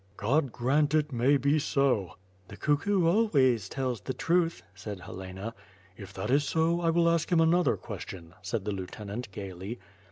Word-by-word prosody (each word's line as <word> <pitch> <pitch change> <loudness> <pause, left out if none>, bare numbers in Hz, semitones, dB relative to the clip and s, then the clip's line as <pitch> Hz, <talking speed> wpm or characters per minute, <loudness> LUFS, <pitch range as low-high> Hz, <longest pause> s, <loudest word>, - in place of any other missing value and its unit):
"God 135 +5 +1
grant 140 +5 +1
it 150 -1 +1
may 130 +3 +3
be 140 +3 +2
so." 135 -8 +2
• 90 - -15 0.3
"The 100 - -11
cuckoo 170 +6 +1
always 140 - +3
tells 130 -4 -2
the 130 - -4
truth," 170 0 +1
said 95 0 -7
Helena. 95 +5 -7 0.4
"If 95 0 -10
that - - -3
is 145 +2 +4
so, 165 +3 +1
I 165 - +2
will 170 +1 +3
ask 170 +1 +1
him 170 - +4
another 165 -2 +3
question," 85 -2 -8
said 100 +2 -3
the 105 - -1
lieutenant 100 +4 -6
gaily. 95 +3 -6
130 Hz, 170 wpm, -29 LUFS, 100-160 Hz, 0.4 s, is